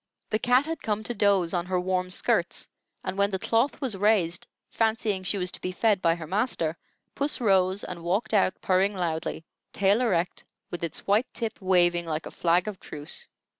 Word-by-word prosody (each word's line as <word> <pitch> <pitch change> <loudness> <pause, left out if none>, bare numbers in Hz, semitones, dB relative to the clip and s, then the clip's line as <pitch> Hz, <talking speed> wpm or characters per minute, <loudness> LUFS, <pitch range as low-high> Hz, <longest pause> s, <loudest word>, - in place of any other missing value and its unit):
The 215 - +1
cat 250 +4 +3
had 325 -1 -4
come 215 0 -1
to 240 - -4
doze 200 -5 +2
on 175 -1 -1
her 185 -1 0
warm 185 0 -1
skirts, 185 - 0 0.4
and 195 - -4
when 200 0 +3
the 190 - -2
cloth 230 +7 +1
was 260 -8 -2
raised, 190 -4 +1 0.2
fancying 220 -3 0
she 185 +2 0
was 180 -1 -1
to - - -4
be 185 - -2
fed 200 +1 +2
by 165 -2 +3
her 170 -2 -7
master, 170 -3 0 0.4
puss 285 +1 0
rose 190 -3 +2
and 170 -2 -7
walked 200 +6 -1
out 195 -2 +2
purring 195 +2 +2
loudly, 165 -2 -3 0.3
tail 200 +4 +2
erect, 180 -7 0 0.3
with 175 - -5
its 165 - -4
white 210 +5 +2
tip 225 -2 -4
waving 175 -2 +3
like 155 -1 -3
a - - -7
flag 175 +3 +2
of 205 -3 -5
truce. 145 0 -4
190 Hz, 195 wpm, -27 LUFS, 175-215 Hz, 0.4 s, cat